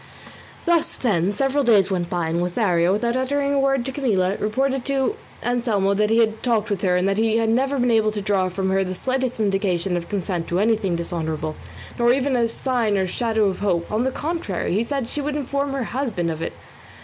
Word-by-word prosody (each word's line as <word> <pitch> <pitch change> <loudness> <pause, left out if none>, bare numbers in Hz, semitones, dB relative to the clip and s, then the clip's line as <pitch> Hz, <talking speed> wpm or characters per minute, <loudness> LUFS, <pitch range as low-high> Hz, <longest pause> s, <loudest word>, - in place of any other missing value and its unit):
Thus, 340 -2 +2
then, 195 -6 +1
several 275 +5 +1
days 205 -6 +4
went 175 -2 -1
by, 170 -2 -1
and 170 +2 0
Lothario, 175 -1 +1
without 235 +4 0
uttering 280 +2 0
a 280 - +2
word 270 -2 +1
to 265 - -3
Camilla, 205 -9 +1
reported 265 +5 0
to 275 +7 0 0.3
Anselmo 230 -5 +1
that 210 +1 +1
he 225 - +3
had 225 -1 +2
talked 225 -3 0
with 195 -2 -1
her 180 -2 +2
and 180 +1 +2
that 195 +1 +1
he 225 0 +2
had 225 -1 +1
never 265 +4 +1
been 245 -1 +2
able 220 -1 +3
to 210 - -2
draw 195 -2 +1
from 190 +1 -2
her 195 0 +2
the 185 0 -4
slightest 255 +3 -2
indication 195 -3 0
of 170 -1 -4
consent 185 -4 -2
to 175 - -1
anything 210 -4 +1
dishonourable, 160 -2 -3 0.4
nor 240 0 +4
even 270 0 +1
a 235 -1 +2
sign 230 -3 0
or 190 - +1
shadow 220 +3 0
of 190 -2 -1
hope; 180 -4 -1
on 215 +3 +1
the 260 - +1
contrary, 275 - -3
he 210 +5 +2
said 270 -1 -3
she 295 - -4
would 290 +1 -2
inform 280 0 -2
her 270 -2 -2
husband 225 -9 -2
of 160 0 -5
it. - - -3
220 Hz, 220 wpm, -22 LUFS, 185-260 Hz, 0.4 s, days